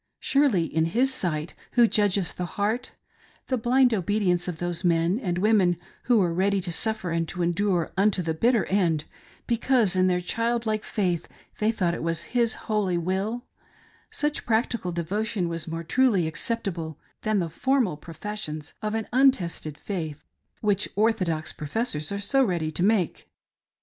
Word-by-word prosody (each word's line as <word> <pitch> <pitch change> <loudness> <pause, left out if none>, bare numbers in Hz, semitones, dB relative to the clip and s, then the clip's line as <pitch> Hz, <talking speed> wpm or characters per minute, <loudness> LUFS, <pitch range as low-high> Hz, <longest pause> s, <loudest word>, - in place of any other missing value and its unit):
Surely, 275 - +3
in 160 0 0
His 250 +10 +2
sight 155 -7 -2
— - - -28
who 240 -1 +6
judges 200 -4 +2
the 180 - -4
heart 215 +4 -1 0.3
— - - -31
the 260 - +2
blind 245 +1 +3
obedience 190 -3 +1
of 175 -3 -3
those 175 +1 -2
men 170 +3 +2
and 180 -8 -2
women 190 -3 +3 0.3
who 245 -2 +4
were 180 -5 +2
ready 195 +3 +2
to 175 -2 -3
suffer 220 0 0
and 165 0 0
to 175 +2 -3
endure 175 0 +1
unto 195 -1 +2
the 160 -1 -1
bitter 230 +7 +2
end, 170 -6 +1 0.4
because 235 -4 +2
in 185 0 +3
their 180 -1 +2
child 230 +5 -1
like 215 -1 -1
faith 180 -5 -1 0.3
they 215 +1 +3
thought 185 -6 0
it - - -4
was 165 0 -1
His 235 -2 +2
holy 205 -5 0
will 195 +8 -2 0.3
— - - -29 0.3
such 295 0 -2
practical 225 -4 0
devotion 185 +3 -2
was 165 -1 -3
more 165 +1 -4
truly 215 -2 +2
accept 230 +8 -1
able 165 -5 -4 0.2
than 215 -1 +1
the 175 -3 0
formal 245 - +1
professions 160 -1 -6
of 215 0 -2
an 225 -1 -2
untested 190 - +2
faith 160 -7 -5 0.4
which 205 -1 +1
or 220 +3 +4
thodox 170 -7 -1
professors 155 - -1
are 200 - -2
so 270 +7 +2
ready 170 -8 -1
to 155 - -3
make. 195 -3 +1
190 Hz, 175 wpm, -26 LUFS, 170-225 Hz, 0.4 s, who